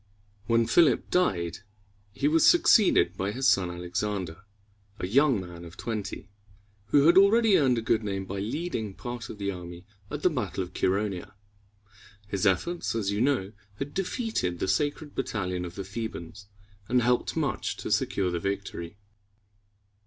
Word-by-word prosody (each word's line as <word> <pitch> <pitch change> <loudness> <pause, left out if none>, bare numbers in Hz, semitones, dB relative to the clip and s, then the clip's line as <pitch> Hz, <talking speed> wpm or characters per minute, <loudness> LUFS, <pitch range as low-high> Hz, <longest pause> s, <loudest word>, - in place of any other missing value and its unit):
When 115 0 +3
Philip 145 -2 +3
died, 90 - +1 0.5
he 140 +7 0
was 160 +2 +3
succeeded 210 - +5
by 95 +2 -2
his 130 +4 0
son 95 -7 +3
Alexander, 90 0 -4 0.5
a - - -3
young 130 +4 +3
man 85 -2 -9
of 85 0 -12
twenty, 105 -3 -5 0.6
who 140 +7 +4
had 170 +3 +7
already 215 +1 +5
earned 130 -7 +3
a 115 - -2
good 115 0 +1
name 95 -2 -3
by 100 +1 -5
leading 110 - -3
part 120 -2 -6
of - - -8
the 100 -1 -2
army 90 -1 -9 0.2
at 150 0 -5
the - - +5
battle 125 -8 -2
of 90 0 -11
Chæronea. 95 -1 -1 0.9
His 100 0 0
efforts, 115 - 0
as 100 -3 0
you 100 +2 -1
know, 125 -7 +1 0.2
had 140 +6 -5
defeated 195 - -2
the 95 - -2
Sacred 145 +9 -1
Battalion 90 -8 -2
of 85 0 -8
the 100 - -4
Thebans, 100 -2 -7 0.4
and 125 -1 +3
helped 125 +1 +1
much - - -1
to - - -5
secure 95 -2 +1
the 85 - -1
victory. 100 -1 -4
105 Hz, 160 wpm, -27 LUFS, 95-135 Hz, 0.9 s, had